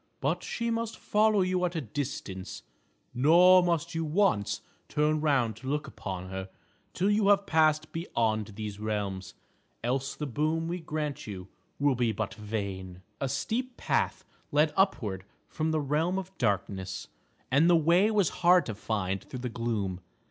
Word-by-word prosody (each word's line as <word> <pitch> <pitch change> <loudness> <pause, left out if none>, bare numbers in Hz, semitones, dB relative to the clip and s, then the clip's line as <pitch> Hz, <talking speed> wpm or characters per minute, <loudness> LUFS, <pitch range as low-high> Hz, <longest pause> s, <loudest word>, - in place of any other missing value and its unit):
But - - 0
she 235 0 -2
must 230 0 -2
follow 210 -1 +3
you 185 0 +1
at 180 -1 0
a - - 0
distance, 115 -7 -5 0.5
nor 175 +8 +7
must 170 -1 0
you 165 0 -1
once 155 - +1 0.3
turn 150 +1 +1
round 130 -8 +2
to 130 - -9
look 150 +1 -1
upon 95 -8 -6
her 95 0 -5 0.4
till 195 +3 +1
you 205 -1 +3
have 200 0 +5
passed 155 -2 +3
beyond 110 - -1
these 105 -1 -5
realms. 100 -3 -3 0.5
Else 135 +3 -1
the 150 - -4
boon 155 +5 0
we 175 +2 -2
grant 150 -5 -4
you 95 -2 -7 0.3
will 145 -1 +3
be 120 -2 +1
but 110 -1 -3
vain." 100 -4 -5 0.2
A 135 - -1
steep 230 - -2
path - - 0 0.3
led 150 +1 +3
upward 110 - +1 0.2
from 155 0 -2
the 160 0 +1
realm 155 +6 0
of 190 0 -6
darkness, 95 -4 -1 0.4
and 145 +6 +5
the 175 - +6
way 170 +6 +4
was 205 -6 +3
hard 175 -2 +6
to 110 - -3
find 100 -3 -2
through 125 - -8
the 125 - -3
gloom. 110 -6 -2
145 Hz, 165 wpm, -29 LUFS, 105-175 Hz, 0.5 s, nor